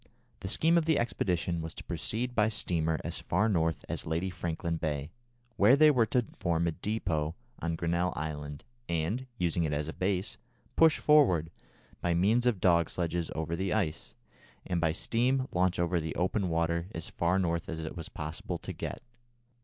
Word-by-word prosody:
The - - -5
scheme 165 - +3
of 160 - -2
the 160 -2 +3
expedition 90 -7 0
was 80 0 -5
to - - -8
proceed 120 +3 -2
by 105 -2 +3
steamer 80 -7 0
as - - -3
far 100 +6 +1
north 80 -6 0
as - - -3
Lady 85 +4 -1
Franklin 85 -1 -3
Bay, 75 -1 -3 0.5
where 130 - +7
they 155 +1 +7
were 120 -5 +3
to 125 -3 +1
form 85 -1 +1
a - - +1
depôt 80 -5 -2 0.2
on 85 0 -1
Grinnel 85 +2 0
Land, 75 -2 -5 0.3
and, 85 +11 -1
using 85 -2 +1
it 75 -2 0
as 75 +1 -1
a 80 - -4
base, 95 +1 -1 0.4
push 160 -1 +6
forward, 95 - +4 0.5
by 85 -1 +1
means 110 +8 +3
of 115 -6 +2
dog 85 -3 +4
sledges 85 -1 -2
over 80 +1 -2
the 95 +1 -1
ice, 85 -7 -2 0.5
and 90 -2 -1
by 80 -2 +3
steam 125 +9 +1
launch 90 0 +1
over 85 0 +1
the 80 -1 -4
open 95 +1 0
water, 85 +1 0
as 80 -1 -4
far 85 +2 +1
north 85 -3 -1
as 80 - -4
it 80 -1 -5
was 80 -2 -6
possible 80 +1 -5
to - - -7
get. - - -5
85 Hz, 185 wpm, -30 LUFS, 80-105 Hz, 0.5 s, where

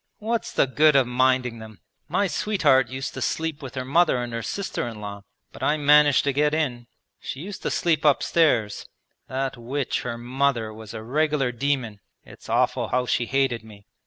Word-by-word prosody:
What's 230 +1 -2
the - - +3
good 150 +3 +4
of 135 -2 +5
minding 125 -1 +1
them? 110 -3 -12 0.3
My 200 - +1
sweetheart 155 - +2
used 130 +1 -5
to - - -6
sleep 160 -2 -2
with 135 -2 -8
her 130 -1 -3
mother 155 +1 +3
and 120 -1 -4
her 115 - -3
sister 195 - -3
in 115 -2 -7
law, 100 -1 -7 0.3
but - - -13
I 150 - +2
managed 150 -1 +5
to 140 - 0
get 150 +2 +2
in. 125 -7 -2 0.3
She 135 - -6
used 195 +3 -7
to - - -2
sleep 160 -3 +1
upstairs; 145 -7 +2 0.4
that 130 0 -3
witch 130 +3 -2
her 120 -2 -4
mother 120 -2 -1
was 110 0 -10
a 110 - -6
regular 145 +1 0
demon; 125 -4 -2 0.3
it's - - -14
awful - - +1
how 125 0 0
she 120 -1 0
hated 135 -3 0
me. 105 -2 -15
130 Hz, 190 wpm, -24 LUFS, 120-150 Hz, 0.4 s, of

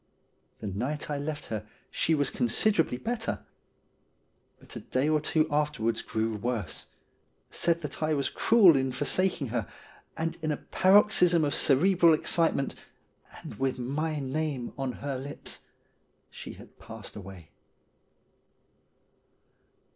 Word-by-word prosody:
The - - -6
night 125 +11 -3
I 145 - -2
left 150 +1 -4
her 105 -1 -3 0.3
she 160 - +1
was 145 -3 0
considerably 160 - +1
better; 230 - -3 1.1
but - - -14
a - - -4
day 130 +3 -1
or 155 -1 +2
two 155 +1 +1
afterwards 145 -7 0
grew 110 0 -2
worse, 110 -5 -3 0.6
said 170 -1 +1
that 150 +1 -6
I 155 0 +1
was 140 -1 0
cruel 210 -8 +5
in 130 -1 +1
forsaking 145 -1 0
her, 115 -4 -2 0.5
and 165 +1 -3
in 155 -1 -1
a 150 - -1
paroxysm 185 -4 +4
of 145 - -1
cerebral 170 +3 +4
ex - - -1
citement, 165 -5 +2 0.7
and - - -9
with 135 -1 0
my 150 +5 -2
name 140 -2 -3
on 135 -2 -3
her 135 -2 -2
lips, 140 +2 -8 0.7
she - - -9
had - - -16
passed - - -9
away. 95 -5 -11
145 Hz, 130 wpm, -28 LUFS, 125-160 Hz, 1.1 s, cruel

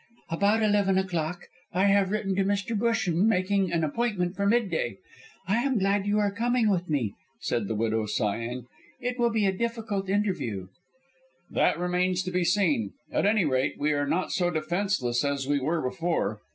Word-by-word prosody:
"About 205 +6 +2
eleven 205 -2 +3
o'clock. 175 -2 -2 0.3
I 185 +2 +2
have 200 -1 +4
written 195 -2 -1
to 195 - +2
Mr. 200 +3 -1
Busham 210 -4 +1
making 190 -2 +1
an 170 -1 +1
appointment 180 +1 -1
for 200 0 0
mid 225 -1 +2
day. - - -1 0.5
I 200 +4 +2
am 255 +1 +1
glad 195 0 +1
you 205 +1 +2
are 205 -1 +2
coming 230 +1 +1
with 180 -2 -1
me," 125 -10 0 0.3
said 110 -4 -1
the 110 - -2
widow, 110 0 0
sighing; 115 +4 -2 0.3
"it 250 0 -3
will 240 0 +3
be 220 -3 +1
a 195 - +3
difficult 220 -3 -2
interview." 180 - -1 0.8
"That - - +2
remains 180 +1 0
to 185 - -4
be 180 0 +1
seen. 165 - +1 0.2
At - - +2
any 210 -4 +3
rate, 130 -2 +1
we 150 +1 +1
are 145 0 0
not 170 +6 0
so 175 -2 +1
defenceless 160 -6 0
as 140 -1 -1
we 145 0 +2
were 155 +5 -1
before. 125 - -1
185 Hz, 180 wpm, -27 LUFS, 150-205 Hz, 0.8 s, have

